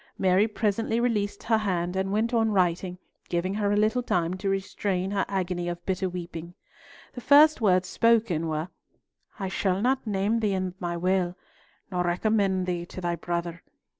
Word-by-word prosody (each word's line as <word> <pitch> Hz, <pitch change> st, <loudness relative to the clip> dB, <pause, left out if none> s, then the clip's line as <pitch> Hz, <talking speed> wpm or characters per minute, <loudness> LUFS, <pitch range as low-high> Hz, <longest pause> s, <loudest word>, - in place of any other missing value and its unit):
Mary 190 Hz, +3 st, +3 dB
presently 225 Hz, +1 st, 0 dB
released 210 Hz, -4 st, -1 dB
her 225 Hz, -1 st, +2 dB
hand 180 Hz, -4 st, -1 dB
and 190 Hz, 0 st, -1 dB
went 220 Hz, +4 st, 0 dB
on 225 Hz, -1 st, +3 dB
writing, 180 Hz, -2 st, 0 dB, 0.3 s
giving 180 Hz, +2 st, -1 dB
her 205 Hz, -1 st, 0 dB
a -, -, +2 dB
little 215 Hz, +4 st, +2 dB
time 175 Hz, -7 st, 0 dB
to 190 Hz, +1 st, -3 dB
restrain 195 Hz, -1 st, -2 dB
her 200 Hz, -2 st, +1 dB
agony 180 Hz, -2 st, -2 dB
of 175 Hz, 0 st, -6 dB
bitter 190 Hz, 0 st, -1 dB
weeping. 175 Hz, -1 st, -7 dB, 0.6 s
The 245 Hz, -, -7 dB
first 290 Hz, +3 st, +6 dB
words 185 Hz, -3 st, +3 dB
spoken 220 Hz, -8 st, +2 dB
were, 155 Hz, +2 st, -2 dB, 0.7 s
"I 195 Hz, -, -2 dB
shall 190 Hz, 0 st, 0 dB
not 255 Hz, +2 st, 0 dB
name 205 Hz, +3 st, +1 dB
thee 210 Hz, -3 st, 0 dB
in 185 Hz, -1 st, -2 dB
my 175 Hz, -1 st, -3 dB
will, 180 Hz, 0 st, 0 dB, 0.5 s
nor 180 Hz, -1 st, 0 dB
recommend 190 Hz, +1 st, +1 dB
thee 175 Hz, -1 st, -2 dB
to -, -, -8 dB
thy 175 Hz, -1 st, -1 dB
brother. 170 Hz, 0 st, -4 dB
190 Hz, 170 wpm, -26 LUFS, 175-215 Hz, 0.7 s, first